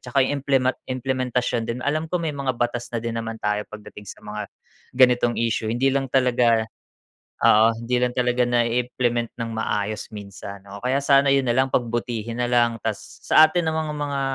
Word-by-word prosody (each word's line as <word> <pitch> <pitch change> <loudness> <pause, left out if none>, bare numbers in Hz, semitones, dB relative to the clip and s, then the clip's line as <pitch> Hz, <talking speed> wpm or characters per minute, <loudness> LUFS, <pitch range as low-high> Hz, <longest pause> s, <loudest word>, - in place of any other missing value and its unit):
saka 130 +1 +1
'yung 145 +1 -2
implema 130 -2 +2 0.2
implementasyon 125 -2 -1
din. 120 +2 -4
Alam 155 +2 -1
ko, 180 - 0
may 165 -3 -2
mga 135 -3 -2
batas 120 0 -2
na 115 -1 -4
din 115 - -2
naman 115 0 -5
tayo 105 -1 -2
pagdating 105 -2 -11
sa - - -11
mga 105 0 -6 0.5
ganitong 125 -2 +4
isyu 115 -1 -1
hindi 130 +4 +1
lang 135 -1 -1
talaga, 120 -3 +3 0.8
oo, 110 +2 +5
hindi 125 +1 0
lang 125 0 0
talaga 125 0 +1
na 120 0 +2
i-implement 120 -1 -1
ng 115 - -3
maayos 105 0 -3
minsan. 100 -1 -9
Oo, 100 - -8
kaya 135 +2 +1
sana 140 0 +4
'yun 135 -3 +1
na 120 - +1
lang 130 0 +1
pagbutihin 120 -1 -2
na 125 - 0
lang, 120 -1 +2
tas 105 -4 -2 0.2
sa 155 0 +7
atin 175 0 -1
namang 160 -1 -2
mga 140 -1 -2
120 Hz, 190 wpm, -23 LUFS, 115-135 Hz, 0.8 s, sa